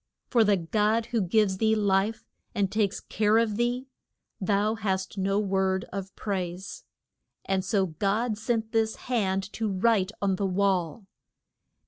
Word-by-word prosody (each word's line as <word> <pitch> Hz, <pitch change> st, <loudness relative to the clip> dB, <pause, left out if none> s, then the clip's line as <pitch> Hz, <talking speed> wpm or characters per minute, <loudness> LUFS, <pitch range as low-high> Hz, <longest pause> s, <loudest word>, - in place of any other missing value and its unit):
For 235 Hz, -4 st, +5 dB
the 205 Hz, -2 st, +3 dB
God 210 Hz, +6 st, +1 dB
who 235 Hz, -2 st, 0 dB
gives 190 Hz, 0 st, +2 dB
thee 220 Hz, 0 st, +3 dB
life 205 Hz, +1 st, +1 dB, 0.3 s
and 200 Hz, -3 st, +1 dB
takes 210 Hz, -2 st, 0 dB
care 215 Hz, 0 st, +2 dB
of 225 Hz, -2 st, +2 dB
thee, 240 Hz, +3 st, 0 dB, 0.5 s
thou 205 Hz, +2 st, +1 dB
hast 190 Hz, -4 st, -2 dB
no 195 Hz, +1 st, +1 dB
word 190 Hz, -2 st, 0 dB
of 195 Hz, -1 st, -5 dB
praise. 185 Hz, -2 st, -4 dB, 0.6 s
And 190 Hz, -1 st, 0 dB
so 195 Hz, 0 st, +1 dB
God 205 Hz, +7 st, 0 dB
sent 220 Hz, +1 st, -2 dB
this 220 Hz, -1 st, +1 dB
hand 195 Hz, -6 st, -1 dB
to 220 Hz, -2 st, -1 dB
write 200 Hz, 0 st, +2 dB
on 195 Hz, -2 st, +1 dB
the 200 Hz, -, 0 dB
wall. 190 Hz, 0 st, 0 dB
200 Hz, 145 wpm, -27 LUFS, 190-220 Hz, 0.6 s, For